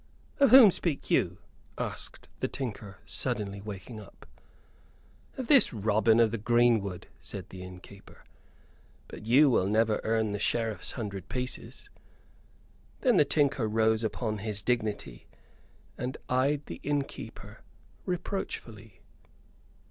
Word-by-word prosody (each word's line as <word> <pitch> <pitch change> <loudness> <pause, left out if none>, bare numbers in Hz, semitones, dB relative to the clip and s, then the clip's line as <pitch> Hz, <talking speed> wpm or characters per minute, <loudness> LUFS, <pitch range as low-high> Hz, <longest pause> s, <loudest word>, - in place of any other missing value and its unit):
"Of 275 -2 +6
whom 240 -4 +10
speak 165 -5 -3
you?" - - +2 0.4
asked - - -4
the - - 0
tinker, 105 -7 -6
suddenly 105 -6 -2
waking 105 +2 -8
up. 105 - -14 1.1
"Of 260 - -3
this 275 +1 +5
Robin 110 +1 +3
of 115 -2 +4
the 115 - -3
Greenwood," 110 -5 +2
said - - -8
the 95 - -9
innkeeper, 90 +2 -12 0.8
"but 105 - -10
you 135 +6 +6
will 95 -5 +2
never 110 +1 +2
earn 110 -1 +1
the 105 - -3
Sheriff's 110 0 -1
hundred 100 -5 -6
pieces!" 125 0 -5 1.1
Then 250 -7 +4
the 150 - +6
tinker 140 -3 +1
arose 110 +1 +2
upon 110 -1 -2
his 105 -1 -2
dignity, 110 - -2 0.7
and 125 +1 -3
eyed 140 +3 +1
the - - -8
innkeeper 145 -1 -4 0.5
reproachfully. 115 - -5
115 Hz, 120 wpm, -29 LUFS, 105-130 Hz, 1.1 s, whom